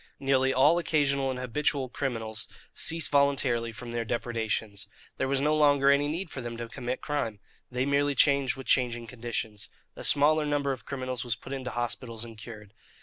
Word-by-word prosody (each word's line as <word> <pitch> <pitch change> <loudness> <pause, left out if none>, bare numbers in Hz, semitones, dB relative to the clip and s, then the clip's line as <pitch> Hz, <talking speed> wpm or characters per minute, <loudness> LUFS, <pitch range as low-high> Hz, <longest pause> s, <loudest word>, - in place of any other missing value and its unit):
Nearly 135 -1 +3
all 145 +6 +5
occasional 140 -4 +1
and 130 - -2
habitual 130 +2 0
criminals 115 -5 -2 0.3
ceased 165 0 +1
voluntarily 135 -5 +2
from 115 +2 -8
their 120 0 -1
depredations. 110 -3 -1 0.3
There 130 - 0
was 135 0 +1
no 150 +2 +2
longer 145 -2 +5
any 140 +1 +3
need 165 +3 -3
for 130 - -5
them 120 -1 -5
to 120 0 -5
commit 120 +2 -4
crime. 115 -8 -2 0.3
They 125 +1 -1
merely 140 0 +2
changed 140 -1 +4
with 135 -1 -9
changing 120 -1 +2
conditions. 115 -3 -4 0.3
A - - -8
smaller 150 +2 +4
number 145 -1 +1
of 130 - -6
criminals 130 -3 -3
was 120 -3 -1
put 125 +5 -9
into 130 -2 -4
hospitals 120 -1 -4
and 115 -1 -10
cured. 110 -2 -10
130 Hz, 180 wpm, -28 LUFS, 115-140 Hz, 0.3 s, all